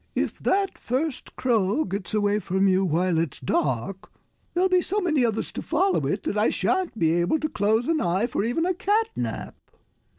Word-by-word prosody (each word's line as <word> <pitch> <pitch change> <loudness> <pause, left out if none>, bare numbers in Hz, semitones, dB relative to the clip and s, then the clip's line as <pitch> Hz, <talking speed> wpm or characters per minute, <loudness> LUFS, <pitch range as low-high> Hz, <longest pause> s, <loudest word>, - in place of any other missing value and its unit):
"If - - -1
that 390 0 0
first 260 +3 -3
crow 230 +1 +1
gets 195 +2 -4
away 205 0 +2
from 190 0 +1
you 190 0 +3
while 175 0 +1
it's 165 -3 -2
dark, 140 - -2 0.4
there'll 365 +2 +3
be 365 -1 +3
so 400 +4 -1
many 315 -9 +1
others 225 -2 -1
to - - -5
follow 370 +4 +1
it - - -2
that - - -1
I - - +3
shan't 375 -9 -1
be 160 -5 +2
able 175 - +1
to 310 - -1
close 220 -1 +1
an 325 -1 +1
eye 180 +5 +1
for 240 -4 -2
even 245 +9 0
a 370 - +1
cat 425 +5 +1
nap." - - -4
225 Hz, 195 wpm, -25 LUFS, -, 0.4 s, you